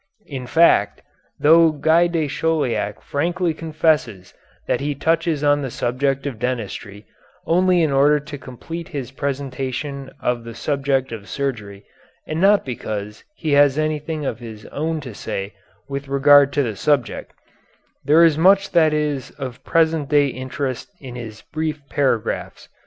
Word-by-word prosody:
In 130 Hz, -4 st, -7 dB
fact, 165 Hz, +6 st, +3 dB, 0.4 s
though 165 Hz, +2 st, +6 dB
Guy 160 Hz, +3 st, +3 dB
de 165 Hz, -3 st, -1 dB
Chauliac 145 Hz, -8 st, -1 dB
frankly 170 Hz, +3 st, -1 dB
confesses 155 Hz, -, -1 dB, 0.3 s
that -, -, 0 dB
he 145 Hz, 0 st, -2 dB
touches 160 Hz, 0 st, 0 dB
on 145 Hz, 0 st, +3 dB
the 135 Hz, -, -3 dB
subject 135 Hz, +3 st, -1 dB
of 130 Hz, -6 st, -4 dB
dentistry 110 Hz, -4 st, -4 dB, 0.4 s
only 180 Hz, 0 st, +3 dB
in 155 Hz, -, +1 dB
order 145 Hz, +2 st, +4 dB
to 145 Hz, 0 st, -8 dB
complete 165 Hz, +7 st, -8 dB
his 135 Hz, -4 st, -6 dB
presentation 135 Hz, 0 st, -4 dB
of 120 Hz, -1 st, -1 dB
the 115 Hz, -1 st, -9 dB
subject 135 Hz, -3 st, -1 dB
of 105 Hz, -3 st, -8 dB
surgery 105 Hz, -8 st, -4 dB, 0.4 s
and 155 Hz, +2 st, -3 dB
not 200 Hz, +1 st, +4 dB
because 105 Hz, -4 st, -5 dB
he 160 Hz, -, -3 dB
has 145 Hz, -1 st, +5 dB
anything 155 Hz, 0 st, -2 dB
of 115 Hz, -3 st, -3 dB
his 110 Hz, -3 st, -10 dB
own 160 Hz, +1 st, -2 dB
to 125 Hz, -5 st, -8 dB
say 100 Hz, 0 st, -5 dB, 0.3 s
with 140 Hz, 0 st, -5 dB
regard 140 Hz, +1 st, +5 dB
to 145 Hz, -, +2 dB
the 110 Hz, -4 st, -3 dB
subject, 135 Hz, 0 st, 0 dB, 0.7 s
there 155 Hz, +5 st, +5 dB
is 160 Hz, -2 st, +4 dB
much 195 Hz, +3 st, +4 dB
that 155 Hz, -3 st, +4 dB
is 150 Hz, -4 st, -2 dB
of 130 Hz, -2 st, -7 dB
present 160 Hz, -3 st, +1 dB
day 145 Hz, -2 st, +4 dB
interest 130 Hz, -, -4 dB
in 130 Hz, -4 st, -9 dB
his 115 Hz, -3 st, -8 dB
brief 155 Hz, -1 st, -3 dB
paragraphs. 130 Hz, -7 st, -1 dB
140 Hz, 150 wpm, -21 LUFS, 125-155 Hz, 0.7 s, though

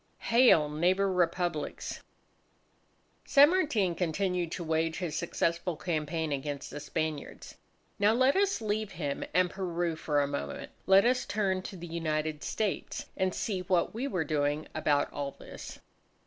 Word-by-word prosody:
HAIL! 230 Hz, -11 st, +6 dB
NEIGHBOUR 180 Hz, +6 st, +2 dB
REPUBLICS! 175 Hz, -2 st, -1 dB, 1.2 s
San 285 Hz, +3 st, +6 dB
Martin 245 Hz, -, +1 dB
continued 180 Hz, 0 st, -1 dB
to 175 Hz, -, -4 dB
wage 160 Hz, 0 st, 0 dB
his 170 Hz, -5 st, -3 dB
successful 170 Hz, 0 st, -1 dB
campaign 160 Hz, -1 st, -2 dB
against 140 Hz, 0 st, -4 dB
the 145 Hz, -, -6 dB
Spaniards. 150 Hz, 0 st, -4 dB, 0.5 s
Now, 205 Hz, +1 st, +5 dB
let 260 Hz, +4 st, +3 dB
us 395 Hz, -7 st, +2 dB
leave 215 Hz, -1 st, -2 dB
him 145 Hz, -5 st, -3 dB
and 180 Hz, +1 st, +2 dB
Peru 175 Hz, -3 st, -2 dB
for 150 Hz, -2 st, 0 dB
a 140 Hz, -, +2 dB
moment. 140 Hz, 0 st, -5 dB, 0.2 s
Let 195 Hz, +2 st, +7 dB
us 250 Hz, +1 st, +2 dB
turn 195 Hz, -3 st, 0 dB
to 190 Hz, -, -8 dB
the 175 Hz, -, -7 dB
United 155 Hz, -2 st, -2 dB
States 210 Hz, -3 st, -2 dB
and 185 Hz, -1 st, 0 dB
see 200 Hz, -5 st, -2 dB
what 180 Hz, -1 st, +1 dB
we 245 Hz, +5 st, -2 dB
were 185 Hz, -11 st, -1 dB
doing 145 Hz, 0 st, 0 dB
about 150 Hz, -2 st, +1 dB
all 140 Hz, -1 st, -3 dB
this. -, -, -9 dB
175 Hz, 150 wpm, -30 LUFS, 155-195 Hz, 1.2 s, Let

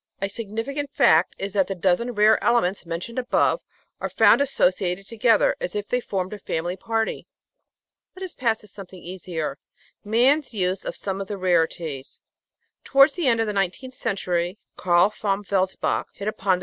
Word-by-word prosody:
A 195 Hz, -, -1 dB
signifi 225 Hz, +5 st, -5 dB
cant 290 Hz, 0 st, -3 dB
fact 160 Hz, +3 st, +4 dB
is 195 Hz, 0 st, -4 dB
that 195 Hz, -2 st, +2 dB
the 195 Hz, -, -3 dB
dozen 190 Hz, +7 st, +1 dB
rare 215 Hz, 0 st, +4 dB
elements 195 Hz, -7 st, +1 dB
mentioned 175 Hz, +9 st, -4 dB
above 255 Hz, -, +1 dB, 0.4 s
are -, -, -3 dB
found -, -, +5 dB
associated 185 Hz, -8 st, +1 dB
together 225 Hz, 0 st, +3 dB
as 180 Hz, -, -4 dB
if 205 Hz, -1 st, -3 dB
they 250 Hz, -, 0 dB
formed 190 Hz, -3 st, -3 dB
a 210 Hz, -, -7 dB
family 175 Hz, 0 st, -3 dB
party. 225 Hz, +2 st, -2 dB, 0.9 s
Let 380 Hz, -, -8 dB
us 370 Hz, -, -5 dB
pass 230 Hz, -4 st, 0 dB
to 210 Hz, -, -14 dB
something 190 Hz, -2 st, -11 dB
easier 170 Hz, -5 st, -5 dB, 0.4 s
man's 250 Hz, +5 st, +2 dB
use 185 Hz, -1 st, -1 dB
of -, -, -4 dB
some 195 Hz, -1 st, -4 dB
of 195 Hz, -, -5 dB
the 205 Hz, -, -4 dB
rarities. 165 Hz, -6 st, -1 dB, 0.6 s
Towards 275 Hz, +1 st, +5 dB
the 345 Hz, -5 st, -1 dB
end 230 Hz, -2 st, +3 dB
of -, -, +1 dB
the 210 Hz, -, -2 dB
nineteenth 200 Hz, +7 st, -2 dB
century, 185 Hz, -6 st, -2 dB, 0.2 s
Carl 175 Hz, +2 st, +3 dB
von 200 Hz, -1 st, -1 dB
Welsbach 190 Hz, -1 st, 0 dB
hit 200 Hz, -, -6 dB
upon 195 Hz, -3 st, +1 dB
the -, -, -8 dB
200 Hz, 175 wpm, -24 LUFS, 180-230 Hz, 0.9 s, found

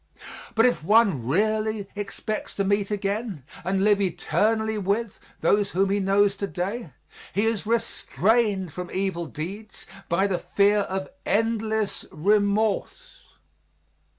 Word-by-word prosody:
But 225 Hz, +1 st, +5 dB
if 245 Hz, -10 st, +2 dB
one 195 Hz, -, +3 dB
really 215 Hz, +5 st, 0 dB
expects 210 Hz, +1 st, -5 dB
to 200 Hz, -, 0 dB
meet 200 Hz, 0 st, +1 dB
again, 205 Hz, -, -2 dB, 0.2 s
and 190 Hz, +2 st, 0 dB
live 205 Hz, -1 st, +4 dB
eternally 215 Hz, +4 st, 0 dB
with, 205 Hz, +3 st, -1 dB, 0.2 s
those 205 Hz, -1 st, +3 dB
whom 195 Hz, +2 st, +2 dB
he 205 Hz, -, +2 dB
knows 200 Hz, +1 st, +3 dB
to 200 Hz, -, -2 dB
day, 195 Hz, +2 st, -4 dB, 0.4 s
he 205 Hz, +3 st, +1 dB
is 225 Hz, -2 st, -1 dB
restrained 215 Hz, -4 st, +1 dB
from 180 Hz, -1 st, -6 dB
evil 185 Hz, -3 st, -2 dB
deeds 195 Hz, +8 st, -7 dB, 0.2 s
by 180 Hz, +4 st, +2 dB
the 190 Hz, -3 st, 0 dB
fear 205 Hz, +3 st, +3 dB
of 190 Hz, -1 st, -2 dB, 0.2 s
endless 220 Hz, -1 st, 0 dB
remorse. 205 Hz, +4 st, 0 dB
205 Hz, 125 wpm, -25 LUFS, 190-215 Hz, 0.4 s, But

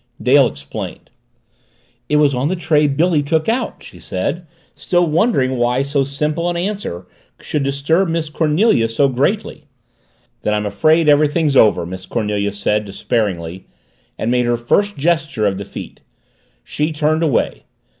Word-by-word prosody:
Dale -, -, +5 dB
explained. 70 Hz, 0 st, -8 dB, 1.0 s
"It 150 Hz, -, +1 dB
was 150 Hz, -2 st, +4 dB
on 125 Hz, +3 st, 0 dB
the 185 Hz, -, 0 dB
tray 155 Hz, -3 st, +2 dB
Billy 155 Hz, +3 st, +2 dB
took 155 Hz, +2 st, 0 dB
out," 235 Hz, +2 st, -2 dB
she -, -, -13 dB
said, 165 Hz, -, -4 dB, 0.3 s
still 175 Hz, -1 st, +1 dB
wondering 155 Hz, -, +1 dB
why 120 Hz, +2 st, +1 dB
so 140 Hz, 0 st, 0 dB
simple 150 Hz, +5 st, -2 dB
an 175 Hz, -, -2 dB
answer 180 Hz, -, -4 dB, 0.3 s
should 150 Hz, -, -3 dB
disturb 140 Hz, +7 st, +1 dB
Miss 165 Hz, -1 st, -1 dB
Cornelia 155 Hz, -, +2 dB
so 140 Hz, +5 st, +2 dB
greatly. 130 Hz, +1 st, -1 dB, 0.8 s
"Then 105 Hz, -, 0 dB
I'm 105 Hz, 0 st, -1 dB
afraid 155 Hz, +11 st, +2 dB
everything's 150 Hz, 0 st, +3 dB
over," 105 Hz, -8 st, +4 dB
Miss 95 Hz, +1 st, -8 dB
Cornelia 105 Hz, -3 st, -1 dB
said 105 Hz, +1 st, -1 dB
despairingly, 95 Hz, -4 st, -3 dB, 0.5 s
and 115 Hz, -, -1 dB
made 125 Hz, 0 st, +2 dB
her 120 Hz, 0 st, +1 dB
first 200 Hz, -, 0 dB
gesture 155 Hz, -7 st, 0 dB
of 100 Hz, -2 st, 0 dB
defeat. 100 Hz, -, -9 dB, 0.6 s
She 150 Hz, +2 st, -2 dB
turned 155 Hz, +1 st, 0 dB
away. 155 Hz, -7 st, 0 dB
145 Hz, 145 wpm, -18 LUFS, 115-160 Hz, 1.0 s, Dale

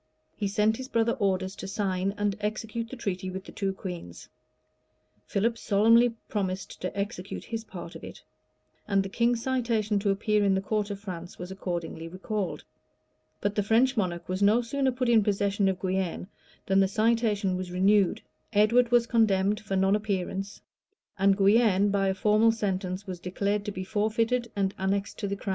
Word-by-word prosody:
[] -, -, -47 dB
He 205 Hz, -, -2 dB
sent 210 Hz, +2 st, +2 dB
his 260 Hz, -, -6 dB
brother 230 Hz, -2 st, +1 dB
orders 190 Hz, -2 st, -1 dB
to 190 Hz, -, -6 dB
sign 195 Hz, -1 st, -1 dB
and 205 Hz, -1 st, 0 dB
execute 215 Hz, +2 st, -3 dB
the 265 Hz, -, -7 dB
treaty 190 Hz, -5 st, -3 dB
with 190 Hz, +1 st, -6 dB
the -, -, -10 dB
two 195 Hz, -2 st, -2 dB
queens; 180 Hz, -, -8 dB, 1.0 s
Philip 230 Hz, +3 st, 0 dB
solemnly 230 Hz, +3 st, +4 dB
promised 190 Hz, -2 st, -3 dB
to 185 Hz, +2 st, -4 dB
execute 200 Hz, -1 st, -4 dB
his 225 Hz, -1 st, -5 dB
part 175 Hz, -4 st, -8 dB
of -, -, -11 dB
it; -, -, -10 dB, 0.6 s
and 195 Hz, -1 st, +2 dB
the 195 Hz, -, -6 dB
king's 235 Hz, +2 st, +1 dB
citation 230 Hz, -5 st, 0 dB
to 200 Hz, 0 st, 0 dB
appear 210 Hz, +1 st, +2 dB
in 195 Hz, -1 st, +3 dB
the 190 Hz, -, 0 dB
court 210 Hz, +1 st, -1 dB
of 200 Hz, -1 st, -5 dB
France, 180 Hz, -4 st, -7 dB
was 180 Hz, +1 st, -7 dB
accordingly 175 Hz, -3 st, -4 dB
recalled; 190 Hz, +2 st, -4 dB, 0.8 s
but 205 Hz, -, 0 dB
the 210 Hz, -, +1 dB
French 235 Hz, +6 st, +3 dB
monarch 175 Hz, -5 st, -2 dB
was 185 Hz, +1 st, -3 dB
no 215 Hz, +4 st, +4 dB
sooner 265 Hz, +3 st, 0 dB
put 250 Hz, 0 st, -2 dB
in 230 Hz, -3 st, +5 dB
possession 200 Hz, -1 st, +1 dB
of 185 Hz, -1 st, -2 dB
Guienne, 185 Hz, -1 st, -2 dB, 0.4 s
than 195 Hz, 0 st, +3 dB
the 195 Hz, -, +4 dB
citation 215 Hz, -2 st, +1 dB
was 185 Hz, 0 st, -4 dB
renewed; 195 Hz, +1 st, +3 dB, 0.3 s
Edward 230 Hz, +4 st, +4 dB
was 240 Hz, -1 st, +4 dB
condemned 210 Hz, -3 st, +2 dB
for 195 Hz, -2 st, -4 dB
non 190 Hz, +1 st, +3 dB
appearance; 195 Hz, -1 st, -3 dB, 0.6 s
and 195 Hz, 0 st, +4 dB
Guienne, 205 Hz, -1 st, +4 dB
by 195 Hz, -1 st, +1 dB
a 190 Hz, -, +1 dB
formal 215 Hz, +3 st, +4 dB
sentence, 195 Hz, -3 st, -2 dB
was 185 Hz, -3 st, -6 dB
declared 200 Hz, +3 st, -1 dB
to 205 Hz, -, -2 dB
be 185 Hz, -1 st, -5 dB
forfeited 225 Hz, +4 st, 0 dB
and 195 Hz, -1 st, 0 dB
annexed 195 Hz, +1 st, -1 dB
to 205 Hz, -, -2 dB
the 200 Hz, -, -2 dB
crown. 200 Hz, -, -6 dB
200 Hz, 185 wpm, -28 LUFS, 190-220 Hz, 1.0 s, in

